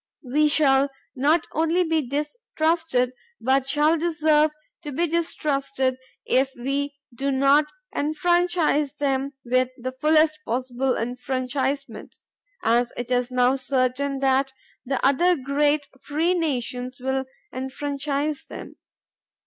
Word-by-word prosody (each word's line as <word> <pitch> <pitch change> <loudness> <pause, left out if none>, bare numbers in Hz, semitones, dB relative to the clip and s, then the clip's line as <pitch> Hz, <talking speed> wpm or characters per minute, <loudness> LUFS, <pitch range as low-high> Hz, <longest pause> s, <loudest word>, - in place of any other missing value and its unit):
We 295 +4 +2
shall 280 -2 +4 0.3
not 300 +5 +2
only 330 +3 +2
be 320 -2 +1
distrusted 300 - -1 0.3
but 265 +2 +1
shall 305 +3 +3
deserve 310 -2 +3 0.3
to 295 -3 -6
be 330 +6 +1
distrusted 275 -6 -1 0.3
if 265 +1 +1
we 280 +3 -2 0.2
do 275 +4 -2
not 275 +3 +4 0.3
enfranchise 315 -1 +1
them 275 -1 -1
with 255 +1 +2
the 255 +1 -4
fullest 310 +3 +3
possible 255 +1 -1
enfranchisement, 255 +1 -3 0.5
as 240 +1 +2
it 245 +1 -5
is 245 0 +1
now 250 +1 +2
certain 265 +1 0
that 270 0 +2 0.3
the 265 0 -2
other 345 +7 +4
great 290 +1 +1
free 320 +5 0
nations 255 -6 -2
will 265 +1 -1 0.3
enfranchise 280 +2 -3
them. - - -9
275 Hz, 115 wpm, -24 LUFS, 260-305 Hz, 0.5 s, shall